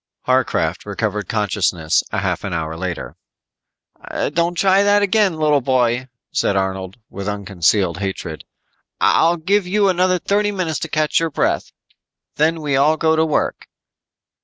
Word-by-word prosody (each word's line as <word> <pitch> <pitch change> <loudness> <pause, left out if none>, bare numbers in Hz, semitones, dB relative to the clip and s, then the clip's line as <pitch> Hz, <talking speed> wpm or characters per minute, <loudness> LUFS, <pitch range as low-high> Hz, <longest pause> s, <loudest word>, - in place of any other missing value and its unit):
Harcraft 120 -10 0
recovered 105 -1 -3
consciousness 95 -7 +1
a - - -2
half - - -2
hour 80 -4 -3
later. 85 0 -5 1.2
"Don't 170 +2 0
try 190 +2 +4
that 205 0 +3
again, 205 -3 +2
little 150 -2 +2
boy," 125 -1 +1 0.2
said 100 - 0
Arnold 95 0 -2
with 100 0 -6
unconcealed 95 -2 0
hatred. 95 -5 -5 0.6
"I'll 170 +2 +3
give 190 +4 +1
you 200 +1 +2
another 185 0 +2
thirty 205 +3 0
minutes 180 -6 -2
to - - -4
catch 155 0 +1
your 165 0 -1
breath. 145 - -1 0.7
Then 160 +2 +1
we 145 -2 0
all 150 +4 +3
go 160 0 +2
to 160 - +3
work." 155 -2 -1
140 Hz, 140 wpm, -19 LUFS, -, 1.2 s, try